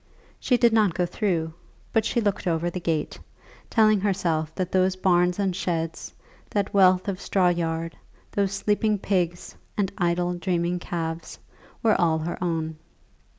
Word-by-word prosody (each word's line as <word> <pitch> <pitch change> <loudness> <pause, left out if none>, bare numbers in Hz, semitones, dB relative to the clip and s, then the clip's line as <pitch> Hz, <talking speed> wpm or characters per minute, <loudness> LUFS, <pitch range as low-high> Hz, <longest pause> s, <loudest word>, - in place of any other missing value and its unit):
She 250 - +2
did 235 -2 +4
not 210 -6 +3
go 180 - +1
through, 170 -4 -1 0.4
but 225 -1 +2
she 235 - +1
looked 205 -3 -1
over 170 0 0
the 180 - -4
gate, 160 -3 -2 0.5
telling 215 -2 +4
herself 170 -6 0
that 185 -1 -2
those 185 0 +2
barns 180 -1 +2
and 195 -3 0
sheds, 165 -3 -3 0.4
that 200 -2 -1
wealth 185 -1 +5
of 195 -2 -3
straw 185 -2 +2
yard, 165 -1 -2 0.4
those 200 -1 0
sleeping 210 +2 +1
pigs 180 -3 -1 0.2
and 195 -3 0
idle 175 0 +1
dreaming 175 -1 -1
calves, 165 -1 -4 0.5
were 215 -4 +3
all 165 -2 +3
her 165 +3 -4
own. 160 -2 -2
180 Hz, 150 wpm, -25 LUFS, 170-200 Hz, 0.5 s, wealth